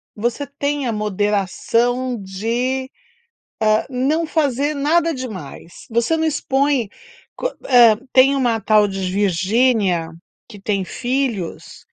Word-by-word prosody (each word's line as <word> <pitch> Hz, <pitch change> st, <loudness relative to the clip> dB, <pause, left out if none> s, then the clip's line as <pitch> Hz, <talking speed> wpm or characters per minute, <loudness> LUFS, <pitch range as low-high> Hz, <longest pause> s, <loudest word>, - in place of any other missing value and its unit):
você 240 Hz, +6 st, -2 dB
tem 285 Hz, 0 st, -2 dB
a -, -, 0 dB
moderação 210 Hz, +5 st, 0 dB
de, 235 Hz, +7 st, -2 dB, 0.7 s
hã, 215 Hz, 0 st, +3 dB
não 280 Hz, +6 st, 0 dB
fazer 290 Hz, -2 st, 0 dB
nada 325 Hz, +4 st, +1 dB
demais. 190 Hz, -, -8 dB
Você 235 Hz, +8 st, +1 dB
não 320 Hz, -, -1 dB
expõe 275 Hz, -5 st, 0 dB, 0.5 s
qu -, -, -1 dB, 0.2 s
eh, 240 Hz, -4 st, +6 dB, 0.2 s
tem 265 Hz, +2 st, +5 dB
uma 240 Hz, -5 st, +1 dB
tal 215 Hz, -1 st, +3 dB
de 195 Hz, 0 st, -5 dB
Virgínia 195 Hz, -1 st, +1 dB, 0.4 s
que 210 Hz, -4 st, -12 dB
tem 195 Hz, -1 st, -1 dB
filhos, 240 Hz, -, -3 dB
240 Hz, 115 wpm, -19 LUFS, 205-275 Hz, 0.7 s, eh